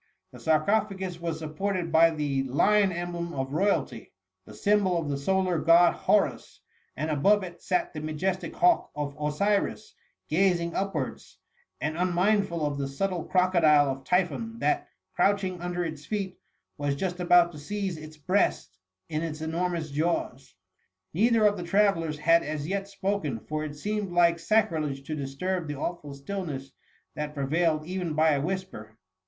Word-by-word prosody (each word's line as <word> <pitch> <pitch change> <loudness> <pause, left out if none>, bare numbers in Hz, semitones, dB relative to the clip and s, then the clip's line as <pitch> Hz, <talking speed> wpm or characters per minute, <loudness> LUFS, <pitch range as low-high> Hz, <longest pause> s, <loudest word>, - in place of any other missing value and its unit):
The - - -12
sarcophagus 190 +2 0
was 165 -2 -2
supported 170 +3 -3
by 165 +1 +6
tlie 145 -4 -1
lion 200 +8 +3
emblem 175 -1 -4
oftoyalty, 150 +9 -1 0.4
the - - -11
symbol 200 -4 +2
of 160 -3 -2
the 140 - -1
solar 185 +2 +1
god 170 +2 +6
Horus; - - 0 0.4
and 155 +2 -2
above 195 +8 +3
it 175 -2 -9
sat 180 -1 -1
the 155 - -5
majestic 155 +5 -2
hawk 350 -1 +3
of 145 -1 -4
Osiris, 200 +8 0 0.3
gazing 170 0 +1
upwards, 185 -9 -4 0.4
and 155 +2 -2
unmindful 180 -2 +1
of 145 -1 -2
the 140 - -1
subtle 175 +5 -2
crocodile 170 -6 +4
of 135 0 -6
Typhon, 185 - 0
that, 360 +7 0 0.3
crouching 190 -3 +1
under 175 0 -2
its 155 -3 -6
feet, 195 -2 -4 0.4
was 145 -1 0
just 180 +3 -3
about 175 -1 +5
to 150 - -10
seize 195 +3 -3
its 155 0 -11
breast 150 - 0 0.3
in 155 - -2
its 160 -2 -4
enormous 165 0 -2
jaws. 140 - -2 0.6
Neither 225 +4 +3
of 205 0 +3
the 175 - -5
travellers 170 -4 +2
had 165 +2 +4
as 150 0 -4
yet 195 +2 -2
spoken, 195 - -2
for 155 +6 -4
it 145 -1 -6
seemed 205 +4 -3
like 170 -1 +4
sacrilege 160 -9 0
to 155 +2 -4
disturb 155 +5 -3
the 150 - -4
awful 150 -2 -5
stillness 140 -4 -5 0.4
that 150 0 -5
prevailed 155 +2 +1
even 180 -3 -3
by 160 +1 +4
a 140 -2 +1
whisper. 150 - -5
170 Hz, 155 wpm, -27 LUFS, 150-190 Hz, 0.6 s, by